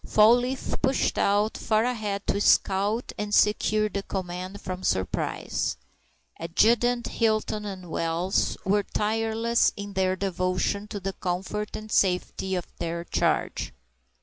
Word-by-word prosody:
Fall 215 +2 +6
leaf 250 +2 -2
pushed 265 0 +1
out 205 +2 +2
far 215 0 +1
ahead 215 -5 -2
to 200 - 0
scout 205 +4 +2
and 210 0 -3
secure 215 0 +3
the 200 -1 -3
command 185 0 -5
from 185 0 -5
surprise. 95 - -1 0.6
Adjutant 235 +8 +2
Hinton 215 -2 0
and 190 -3 -7
Wells 165 +3 0
were 205 +2 +3
tireless 225 +3 +1
in 200 0 -6
their 185 -1 +1
devotion 185 +2 -1
to 210 - -5
the 195 0 -4
comfort 195 +4 -3
and 215 0 -7
safety 190 0 +1
of 180 - -3
their 170 0 -3
charge. - - -1
205 Hz, 130 wpm, -26 LUFS, 185-215 Hz, 0.6 s, Fall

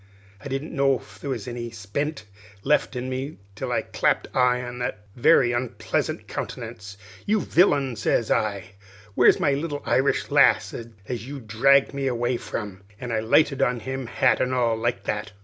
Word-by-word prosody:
I - - -6
didn't 135 +3 -4
know 135 -1 +3
if - - -16
there 140 - -6
was 120 -5 -4
any 120 -1 -5
spent 115 +6 -4 0.4
left 150 -1 +1
in 125 +1 -3
me, 130 +3 -4 0.2
till - - -5
I - - 0
clapped - - -1
eye 125 -1 +3
on 125 0 -7
his 125 - -1 0.2
very 120 -1 +4
onpleasant 120 0 -2
countenance. 105 -1 -6 0.3
'You 215 +1 +3
villain!' 145 -9 +2
sez 110 +1 0
I, 100 -2 -1 0.4
'where's - - +5
my 145 - +2
little 145 +1 -3
Irish 135 +2 +1
lass - - +4
as 115 +1 -7
you 140 0 -6
dragged 135 +5 +3
me 140 -1 -2
away 120 0 0
from?' 100 -5 -6 0.2
an' 125 -1 -5
I 110 - +1
lighted 135 +5 +3
on 125 -3 +1
him, 130 +1 -4
hat - - +2
and 130 0 0
all, 120 -2 +2
like 115 -3 -2
that!" 105 +1 -3
125 Hz, 175 wpm, -24 LUFS, 115-135 Hz, 0.4 s, where's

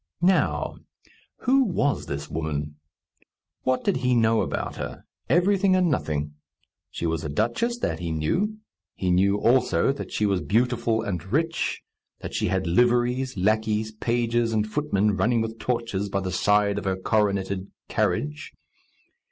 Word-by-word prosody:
Now, 185 +1 +2 0.6
who 270 +2 +4
was 145 - 0
this - - -4
woman? 75 -1 -3 0.8
What 130 0 0
did 200 - +1
he 125 -1 +1
know 115 -1 +3
about - - -3
her? - - -6 0.3
Everything 190 +2 +3
and 180 -3 +3
nothing. 75 - -2 0.6
She - - -5
was 80 -1 -1
a 75 - -3
duchess, 120 - 0
that 80 - -2
he 85 -1 -3
knew; 175 - 0 0.4
he 90 -1 -1
knew, 100 +3 +3
also, 120 -2 +3
that 140 - -7
she 105 - 0
was 100 -3 +1
beautiful 115 0 +1
and 90 -6 -3
rich; 165 +5 0 0.4
that - - -6
she - - 0
had 95 0 0
liveries, 120 +6 +2
lackeys, 110 +2 +1
pages, 115 +1 0
and 105 -1 +1
footmen 105 -5 0
running 120 0 +2
with 115 0 -3
torches 115 -5 -2
by 100 0 -1
the 95 -1 -3
side 105 +2 +2
of - - -9
her 95 -1 +1
coroneted 100 -1 0 0.2
carriage. 75 0 -1
110 Hz, 150 wpm, -25 LUFS, 95-125 Hz, 0.8 s, who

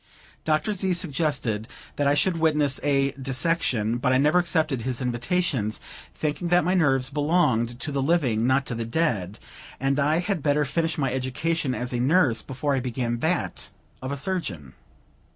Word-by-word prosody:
Dr. 155 +6 +1
Z. 190 -1 0
suggested 140 - -1 0.3
that 145 - +1
I 140 - +4
should 175 +3 +2
witness 150 -4 +2
a 140 -1 +2
dissection; 130 -5 +1
but 125 0 +1
I 130 - +4
never 150 +6 +4
accepted 155 -7 +1
his 125 +1 -3
invitations, 125 - -1 0.4
thinking 155 +3 -2
that 175 0 +4
my 180 +3 +1
nerves 135 -7 +2
belonged 135 -6 +1
to 150 - -2
the 140 -1 -1
living, 130 -7 +1
not 135 +1 +2
to - - -3
the 115 0 -3
dead, 115 - -1 0.4
and 135 +1 0
I 150 +3 +2
had 180 -1 -1
better 150 0 +2
finish 165 +3 -1
my 135 -4 0
education 130 +2 -1
as 125 +1 -4
a 120 - -1
nurse 130 -4 +3
before 135 +5 -2
I 135 - +1
began 120 -1 -2
that 165 +6 -1 0.3
of 130 +1 -4
a 140 - -2
surgeon. 135 - -3
140 Hz, 170 wpm, -25 LUFS, 125-160 Hz, 0.4 s, I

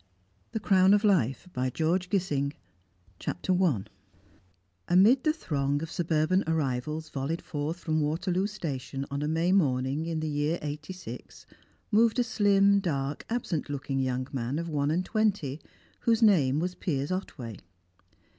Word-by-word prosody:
THE 220 - -2
CROWN 190 -1 +5
OF 210 - +1
LIFE 180 - +2
by 130 +1 0
George 170 +6 0
Gissing 150 -8 0 0.7
CHAPTER 185 - -2
I 130 - +2 1.0
Amid 210 +9 +5
the 310 - +4
throng 145 - -1
of 165 - -6
suburban 170 +2 +1
arrivals 155 0 -1
volleyed 140 +5 -3
forth 155 +1 -3
from 155 -1 0
Waterloo 180 +6 0
Station 140 -9 -4
on 140 +1 -2
a 150 - -1
May 165 +3 +1
morning 140 -3 +1
in 165 -1 -2
the 155 - -2
year 150 +2 0
'86, 150 +5 -7 0.5
moved 225 +2 +4
a 245 - +4
slim, 200 -4 +4
dark, 145 -6 -3
absent 210 -11 -2
looking 140 -1 -2
young 130 -1 -1
man 130 +2 -2
of 170 +1 -3
one 145 -2 0
and 175 +4 0
twenty, 200 - 0 0.4
whose 230 -1 +2
name 150 -11 +4
was 180 +2 -1
Piers 150 -4 -2
Otway. 125 - -5
160 Hz, 145 wpm, -28 LUFS, 140-190 Hz, 1.0 s, CROWN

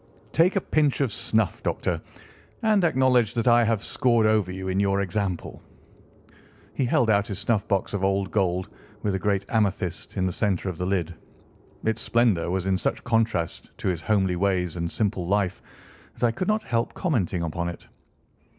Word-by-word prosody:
Take 175 +4 +4
a 195 - +2
pinch 150 -5 +1
of 130 -5 +1
snuff, 110 -1 0
Doctor, - - -1 0.6
and 215 -3 +3
acknowledge 125 -7 +3
that 115 +1 0
I 120 0 +6
have 110 -2 0
scored 120 -3 +2
over 110 -4 +2
you 95 0 -5
in 95 +1 0
your 100 0 +2
example." 95 -2 -3 1.1
He 135 - 0
held 120 -1 +2
out 100 -1 +2
his 100 - -4
snuffbox 100 -2 0
of 100 -2 -2
old 95 -1 +1
gold, 95 -3 0 0.4
with 105 - 0
a 95 - -1
great 100 0 0
amethyst 100 -5 -1
in 95 - +1
the 90 - -1
centre 95 -1 0
of 85 - -6
the 90 - -1
lid. 90 -3 -1 0.7
Its 110 0 0
splendour 115 -8 +2
was 95 0 -1
in 95 -1 +1
such - - -1
contrast 115 -8 0
to - - -1
his 85 -3 -2
homely 95 -2 +1
ways 90 -3 0
and 85 -1 -3
simple 100 -5 -1
life 95 -1 0 0.6
that - - +1
I 115 - +3
could 180 +11 -3
not 215 0 +1
help 115 0 -1
commenting 100 - 0
upon 85 +1 -2
it. 85 - -9
100 Hz, 180 wpm, -25 LUFS, 95-115 Hz, 1.1 s, I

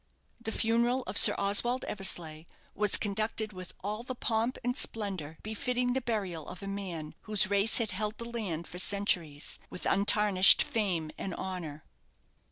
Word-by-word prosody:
The 220 - -2
funeral 235 +4 0
of 190 - -7
Sir - - +9
Oswald 240 +6 +2
Eversleigh 165 -5 +1 0.3
was 210 0 +3
conducted 215 +1 -2
with 185 -1 -10
all 210 +3 -4
the 255 +1 -7
pomp 230 +1 -1
and 245 +1 -1
splendour 190 - -2
befitting 245 +3 -2
the 265 - -1
burial 195 - -4
of 180 +2 -10
a - - -6
man 185 -6 -6 0.2
whose 205 -2 +2
race 200 +2 +4
had 225 -3 -1
held 210 +3 -3
the 235 - -6
land 205 -9 -5
for 180 - -6
centuries, 180 -7 0
with - - -9
untarnished 200 -1 +5
fame 180 -8 -2
and 190 - -5
honour. 165 -6 -6
200 Hz, 160 wpm, -29 LUFS, 180-225 Hz, 0.3 s, Sir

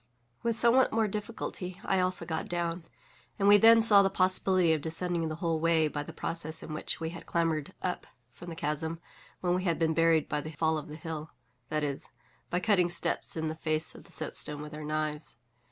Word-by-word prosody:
With 230 -1 -1
somewhat 240 +3 +4
more 220 -1 +2
difficulty 200 -3 -5
I 190 - +2
also 185 0 0
got 160 -1 -3
down; 170 -1 -2 0.5
and 200 - +2
we 205 0 +9
then 225 +2 +7
saw 205 -3 +8
the 195 - +3
possibility 185 -2 +2
of 155 - -1
descending 165 +1 -2
the 155 - -4
whole 165 -1 -1
way 165 -1 +3
by 145 -1 -3
the 145 - -8
process 160 -1 -2
in 155 - -7
which 155 - -3
we 160 0 -3
had 170 - -10
clambered 165 -3 -1
up 180 - -3 0.2
from 175 - -11
the 165 - -6
chasm 160 +2 -2 0.4
when 175 -1 +1
we 185 +1 0
had 170 -3 +1
been 160 -1 +1
buried 165 -1 +3
by 150 -1 -2
the 155 +2 -8
fall 160 +1 +1
of 150 - -10
the 150 - -8
hill—that 150 -3 -6
is, 140 -2 -2 0.4
by 180 - 0
cutting 185 -3 +3
steps 170 -1 -2
in 160 0 -1
the 155 - -2
face 155 0 -2
of - - -14
the - - -17
soapstone 150 0 0
with 150 0 -9
our 155 0 -7
knives. 150 -3 -3
165 Hz, 210 wpm, -30 LUFS, 155-185 Hz, 0.5 s, we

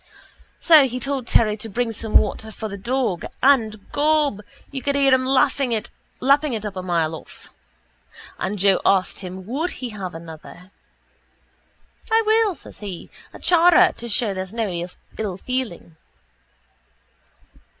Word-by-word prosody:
So 310 -5 +7
he 250 0 -4
told 270 -1 -3
Terry 215 -2 +3
to 220 +1 -8
bring 235 +3 -1
some 220 0 -6
water 220 +1 -1
for 220 - -6
the 200 - -6
dog 230 -3 -1 0.2
and, 220 -7 +3
gob, 295 -6 +2 0.3
you 270 -2 -4
could 280 +1 -1
hear 275 -1 +4
him 255 0 +2
lapping 270 0 +2
it 220 - -3 0.7
up 205 -2 -5
a 185 - -4
mile 170 -3 0
off. 160 - -12 0.9
And 195 +3 -2
Joe 195 0 +3
asked 190 -2 +2
him 185 0 -8
would 290 - -2
he 250 - -6
have 190 -5 -6
another. 165 +3 -11 1.4
—I 450 0 +4
will, 435 -3 +3
says - - -12
he, 195 -5 -8 0.2
a - - -11
chara, 350 0 +5
to 235 - -7
show 215 -1 0
there's 190 +2 -6
no 225 -2 0 0.5
ill 200 -5 -3
feeling. 220 -9 -4
225 Hz, 145 wpm, -22 LUFS, 190-270 Hz, 1.4 s, So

